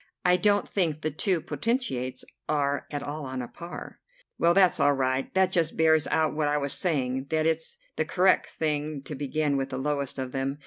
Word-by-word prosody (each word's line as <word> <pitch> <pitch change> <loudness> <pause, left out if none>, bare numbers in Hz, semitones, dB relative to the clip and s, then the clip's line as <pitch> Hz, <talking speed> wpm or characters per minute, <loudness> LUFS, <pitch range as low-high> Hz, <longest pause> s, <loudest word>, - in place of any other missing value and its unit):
I 180 0 +6
don't 205 +2 +2
think 160 -6 0
the 155 - -1
two 175 +3 +1
potentates 145 - -2 0.2
are 145 -2 0
at 145 -1 -4
all 150 +1 -5
on 130 -1 -4
a - - -6
par." 170 +6 -9 0.4
"Well, 170 +1 +4
that's 190 -2 +5
all 145 - +4
right. 130 0 0
That 190 -1 +3
just 165 -4 +1
bears 160 -1 +4
out 160 -1 +1
what 155 -1 +1
I 145 0 +2
was 140 -1 +1
saying, 130 -6 0
that 155 +2 0
it's 160 0 -1 0.2
the 155 - +1
correct 185 +4 +3
thing 150 -2 -2
to 150 - -7
begin 145 +1 0
with 135 0 -2
the 130 - -4
lowest 140 0 -2
of 130 -1 -4
them. 135 +1 -2
150 Hz, 205 wpm, -27 LUFS, 135-165 Hz, 0.4 s, I